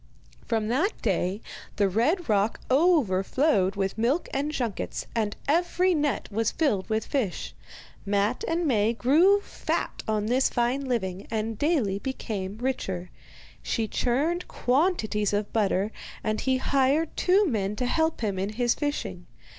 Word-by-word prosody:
From 220 -2 0
that 320 - 0
day 195 0 0 0.3
the 205 -1 +3
red 275 - +1
rock 210 0 +1
overflowed 255 - +3
with 195 +1 -2
milk 260 +9 +1
and 285 +3 -1
junkets, 240 -9 -3
and 215 -3 -1
every 350 +4 +2
net 295 -3 0
was 225 +2 +1
filled 220 - 0
with 220 0 0
fish. 250 -11 -2 0.5
Matte 205 +4 0
and 335 +1 0
Maie 225 -5 +2
grew 330 - +4
fat - - -3
on 215 -1 0
this 250 +4 +2
fine 245 +3 0
living, 195 -7 -2
and 220 0 -2
daily 245 - +1
became 210 -6 -4
richer. 195 -8 -3 0.5
She 225 -2 -1
churned 290 +11 0
quantities 245 - +1
of 205 0 -1
butter, 205 -1 +1 0.3
and 215 0 -1
he 260 -1 +1
hired 275 +4 +1
two 385 +3 +3
men 210 - -1
to 250 - -2
help 320 +4 0
him 200 -4 -1
in 200 +3 -2
his 240 +1 +2
fishing. 290 -1 -4
235 Hz, 145 wpm, -26 LUFS, 205-290 Hz, 0.5 s, grew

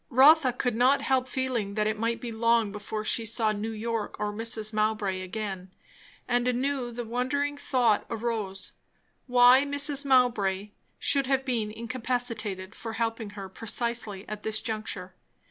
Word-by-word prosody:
Rotha 275 +1 +6
could 245 -1 -1
not 255 +4 +3
help 260 -1 +1
feeling 245 -7 -2
that 215 -1 +1
it 215 0 -1
might 230 +1 0
be 240 -2 -5
long 230 -1 +2
before 215 +1 -5
she 230 - +3
saw 225 0 +1
New 215 +1 -3
York 225 0 -3
or 210 0 -2
Mrs. 220 0 -1
Mowbray 215 -3 0
again; 190 -1 -5 0.6
and 245 0 +1
anew 255 0 0
the 240 0 -5
wondering 260 +5 -1
thought 245 -6 +1
arose, 220 -4 -3 0.6
why 250 +1 +7
Mrs. 285 0 +3
Mowbray 210 -7 +2 0.3
should 275 -2 +1
have 270 0 +1
been 230 -5 -1
incapacitated 230 -4 -3
for 225 -1 -7
helping 225 -2 -2
her 195 -1 -5
precisely 225 -1 -2
at 210 0 -6
this 220 0 0
juncture? 210 -5 -5
230 Hz, 150 wpm, -27 LUFS, 210-250 Hz, 0.6 s, why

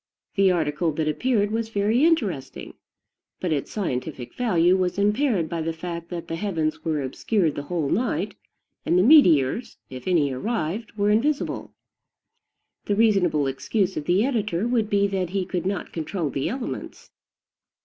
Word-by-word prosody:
The 195 -1 +4
article 160 -1 0
that 155 +1 -1
appeared 210 - +1
was 225 0 -2
very 220 +5 +1
interesting; 210 - 0 0.7
but 180 - -2
its 140 - -2
scientific 135 - -4
value 180 -7 +3
was 185 -1 0
impaired 210 - +2
by 165 0 -3
the 165 +1 -2
fact 170 0 -6
that 170 -2 -6
the 165 - -3
heavens 165 -5 -2
were 155 -3 -1
obscured 165 - 0
the - - -4
whole 160 0 -2
night, 235 - -1 0.5
and 175 - +2
the 180 - +5
meteors, 210 - +5
if 130 -1 -8
any 160 -7 +2
arrived, 215 - -3
were 205 0 +2
invisible. 275 +7 0 1.1
The 205 - 0
reasonable 195 -9 +3
excuse 185 +8 -1
of 150 - -4
the 185 +7 +3
editor 215 -6 -1
would 230 -3 +1
be 200 0 +3
that 190 -3 -1
he 190 0 -1
could 180 -1 -3
not 195 -1 -3
control 165 -1 -3
the 135 - -2
elements. 255 0 -6
185 Hz, 160 wpm, -24 LUFS, 160-215 Hz, 1.1 s, the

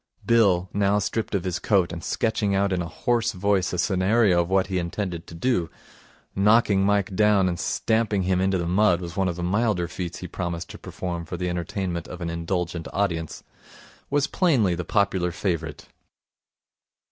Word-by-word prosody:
Bill, 100 -6 +3
now 100 0 +2
stripped 105 +2 -2
of 95 - -1
his 90 -2 -2
coat 95 -5 +2
and 85 - -7
sketching 110 -3 0
out 100 0 +1
in 90 - 0
a 85 - -3
hoarse 120 +7 0
voice 95 -1 +1
a 90 - -3
scenario 95 +1 +3
of 85 - -4
what 95 0 +3
he 95 -2 -2
intended 85 -1 -4
to 85 - -10
do 85 -3 0 0.7
knocking 100 -1 +4
Mike 100 -1 +1
down 105 -2 +4
and 85 -2 -2
stamping 110 -3 0
him 90 0 +1
into 95 0 +2
the 85 - -2
mud 90 0 +3
was 85 -1 -7
one 95 -1 +1
of 90 - -2
the 90 - -5
milder 100 -1 +1
feats 90 -1 -5
he 90 - -7
promised 85 -1 -4
to - - -10
perform 85 -2 -5
for 90 - -6
the 90 +1 -2
entertainment 90 0 -3
of 90 - -8
an 85 -2 -3
indulgent 85 0 -3
audience 85 -5 -2 0.7
was 145 0 +2
plainly 140 - +2
the 85 +1 -3
popular 95 -3 +1
favourite. 80 -5 -3
95 Hz, 180 wpm, -24 LUFS, 85-100 Hz, 0.7 s, knocking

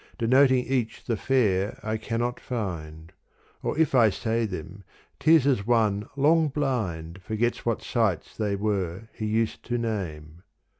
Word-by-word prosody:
Denoting 130 +2 +4
each 125 -4 -2
the 115 - 0
fair 105 -5 +1
I 110 0 -1
cannot 120 +2 -2
find: 85 -8 -5 0.5
Or - - -2
if 160 -2 +2
I 120 -4 +6
say 110 +3 -1
them 95 +1 -7 0.4
't 155 - +3
is 150 -5 +4
as 125 -8 +1
one 110 -4 +2
long 155 +3 +4
blind 100 - -2
Forgets 110 +6 -2
what 115 - 0
sights 110 -8 0
they 105 -2 -1
were 100 0 -2
he 110 - -4
used 110 +1 0
to 120 0 -1
name. 85 -9 -4
110 Hz, 150 wpm, -26 LUFS, 95-125 Hz, 0.5 s, I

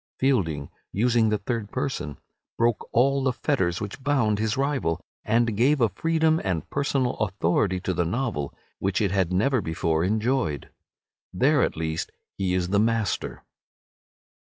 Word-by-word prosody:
Fielding, 85 - 0 0.2
using 115 +1 +3
the 105 - +1
third 105 +1 -3
person, 130 - -3 0.4
broke 115 -1 +1
all 135 +3 +3
the 130 - +2
fetters 105 - 0
which 105 +5 -6
bound 130 -7 +1
his 110 +3 0
rival, 135 - 0 0.2
and 115 -1 +2
gave 135 +7 +3
a 115 -3 +4
freedom 160 - +1
and 90 -6 -2
personal 140 -3 0
authority 95 -2 +1
to 95 - -2
the 90 - +1
novel 85 - -2 0.3
which 95 0 0
it 100 -4 +1
had 95 -3 +1
never 110 +7 +2
before 80 -1 0
enjoyed. 110 - 0 0.6
There - - +3
at - - 0
least 80 0 -2 0.2
he 95 -2 0
is 90 -1 0
the 100 +1 +3
master. 110 -2 0
105 Hz, 150 wpm, -25 LUFS, 90-130 Hz, 0.6 s, a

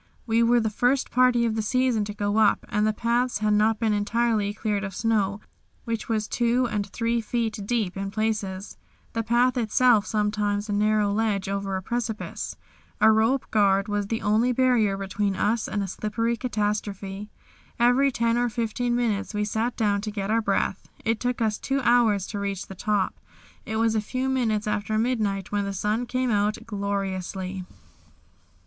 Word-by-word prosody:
We 230 0 +2
were 240 +1 +4
the 220 -2 -1
first 250 +5 +1
party 250 -1 +4
of 225 - 0
the 220 - 0
season 245 -1 +1
to 210 - -5
go 205 0 -1
up, 215 -2 +3
and 210 +1 +1
the - - +3
paths 235 +3 0
had 210 0 +1
not 215 +1 +3
been 220 -1 +1
entirely 210 0 +1
cleared 210 -1 -2
of 195 -2 -5
snow, 210 -3 0 0.4
which 230 -1 -3
was 215 -1 0
two 240 +1 +1
and 210 -3 -2
three 230 +3 -1
feet 225 -1 -2
deep 220 -6 0
in 195 0 -3
places, 210 -2 -3 0.4
the 230 - 0
path 240 +3 +2
itself 225 -1 +3
sometimes 210 -1 0
a 205 - -2
narrow 210 0 +2
ledge 205 -3 0
over 195 0 -2
a 190 - -6
precipice. 230 0 -4 0.4
A 220 +1 +6
rope 225 +5 +2
guard 200 -1 +3
was 205 -1 -1
the 225 +1 -3
only 220 +4 +3
barrier 240 -6 +2
between 195 0 -1
us 215 +4 0
and 205 - -2
a - - -3
slippery 215 +5 -1
catastrophe. 205 -3 -3 0.5
Every 245 +4 +4
ten 235 -1 +1
or 245 0 +1
fifteen 240 +1 -1
minutes 220 -4 -1
we 210 0 0
sat 225 +3 -2
down 205 -2 +1
to 215 - -4
get 205 -1 -3
our 230 +1 +3
breath. 195 -2 -1 0.2
It 225 -1 +1
took 245 -1 -1
us 215 -1 0
two 275 0 -1
hours 235 -6 +3
to 205 - -4
reach 200 -1 -3
the - - -9
top. 205 0 -1 0.5
It 220 - -3
was 225 0 +2
a 220 - +1
few 255 +5 -2
minutes 225 -5 0
after 210 +1 -1
midnight 215 -5 -1
when 205 -1 0
the 200 - -3
sun 210 +5 -1
came 255 0 0
out 210 0 +1
gloriously. 195 -3 -3
215 Hz, 180 wpm, -25 LUFS, 205-235 Hz, 0.5 s, A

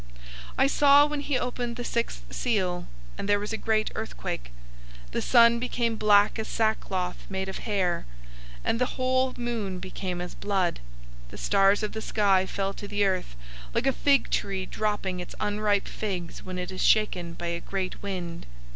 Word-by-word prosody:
006:012 - - -19 0.5
I - - +5
saw 285 +1 +6
when 295 0 -2
he 285 -2 0
opened 245 -1 -2
the 245 - -4
sixth 235 - -2
seal, 185 -7 0 0.3
and 200 - -3
there 205 0 +4
was 210 +2 -4
a - - +1
great 220 -1 0
earthquake. - - -5 0.6
The - - -1
sun 235 -1 +6
became 235 -2 0
black 210 0 +4
as 220 - -3
sackcloth 195 -5 -1
made 190 0 -2
of 190 - -5
hair, 185 - 0 0.6
and 230 - 0
the 250 - 0
whole 260 0 +2
moon 230 -6 -2
became 185 0 -4
as 180 0 -5
blood. 195 -4 0 0.5
006:013 - - -17
The - - -10
stars 195 - +3
of 210 - -1
the 220 - -4
sky 195 -4 +2
fell 195 0 -2
to 205 - -8
the 205 0 +1
earth, 185 - -1 0.4
like - - +1
a 270 - +3
fig 280 0 +3
tree 195 -2 -1
dropping 205 -3 -2
its 180 - -7
unripe 205 -1 +1
figs 185 -5 -4
when 185 -1 -6
it 180 0 -4
is 185 - -4
shaken 180 -6 +2
by 170 - -6
a 170 0 -3
great 190 -2 -4
wind. 180 -4 -5
205 Hz, 180 wpm, -27 LUFS, 185-230 Hz, 0.6 s, saw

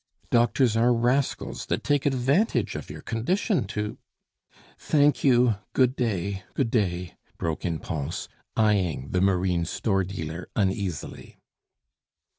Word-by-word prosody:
Doctors 120 0 +3
are 120 +2 +4
rascals 125 +4 0
that - - -1
take 145 -1 +1
advantage 135 - +1
of - - -6
your - - -8
condition 160 - 0
to 105 +1 -4 0.4
" - - -28
"Thank 145 -1 +3
you, 120 -5 +4 0.2
good 130 0 +3
day, 100 -6 -1
good 120 -5 0
day," 90 -6 -1 0.2
broke 80 -1 -3
in 85 -2 0
Pons, 75 0 -4 0.3
eying 95 - +1
the 90 - +1
marine 90 -2 +2
store 95 +3 0
dealer 85 -2 -6
uneasily. 95 -6 -2
105 Hz, 125 wpm, -26 LUFS, 90-125 Hz, 0.4 s, are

